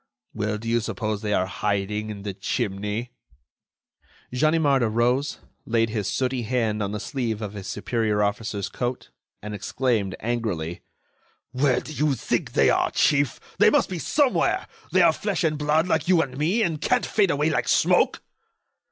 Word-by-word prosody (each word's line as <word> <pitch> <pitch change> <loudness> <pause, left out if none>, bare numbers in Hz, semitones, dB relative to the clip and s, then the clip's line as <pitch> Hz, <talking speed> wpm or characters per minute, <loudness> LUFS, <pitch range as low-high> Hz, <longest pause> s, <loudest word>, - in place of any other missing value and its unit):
"Well, 105 0 -2
do 115 +2 -8
you 115 +1 +2
suppose 110 -2 -3
they 105 -2 -2
are 95 -2 +2
hiding 105 +2 -2
in 100 -2 -7
the 100 -1 -4
chimney?" 105 +3 -3 1.2
Ganimard 145 0 +3
arose, 120 +5 +1 0.3
laid 115 -1 +1
his 105 -3 -2
sooty 130 -1 -1
hand 110 -2 0
on 100 -1 -2
the 105 - -3
sleeve 115 -3 -3
of 105 -2 -5
his 100 -2 -7
superior 110 -3 0
officer's 105 0 -2
coat, 125 0 -4 0.3
and 105 0 -5
exclaimed, 105 -1 -1
angrily: 105 -8 -3 0.7
"Where 130 0 +2
do 155 - -9
you 150 -2 +1
think - - -2
they - - +4
are, - - +2
chief? 145 -3 +2 0.2
They - - +7
must - - +2
be 180 -2 -4
somewhere! 280 - +1 0.2
They - - +5
are - - +6
flesh 200 -4 -2
and 155 -2 +2
blood 150 +3 +1
like 160 -2 0
you 175 -3 +5
and 130 -2 -8
me, 175 - +1
and 160 -5 -1
can't 250 -1 +2
fade 205 -4 +2
away 150 +1 +1
like - - 0
smoke." - - +3
120 Hz, 170 wpm, -24 LUFS, 105-145 Hz, 1.2 s, They